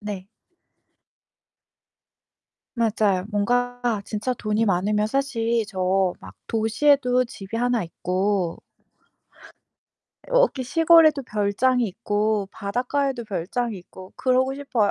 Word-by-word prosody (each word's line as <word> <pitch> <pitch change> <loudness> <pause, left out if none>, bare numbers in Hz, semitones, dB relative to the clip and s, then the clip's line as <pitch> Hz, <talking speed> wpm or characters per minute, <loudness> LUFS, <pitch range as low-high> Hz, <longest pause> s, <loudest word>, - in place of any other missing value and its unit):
네. 205 -2 -6 2.5
맞아요. 215 -5 +1
뭔가 245 +4 0 0.2
진짜 220 +5 -2
돈이 215 -1 0
많으면 210 +2 +1
사실 235 -4 0
저 185 -1 0
막 95 +1 -12
도시에도 250 +3 +2
집이 210 -2 -8
하나 245 -1 +1
있고 185 +1 -1 1.7
여기 - - +2
시골에도 320 0 +5
별장이 230 +3 +1
있고 210 0 -1
바닷가에도 245 +6 -2
별장이 210 +3 -3
있고 185 +1 -13
그러고 260 +1 +2
싶어요. 250 -7 0
220 Hz, 215 characters per minute, -23 LUFS, 200-255 Hz, 2.5 s, 시골에도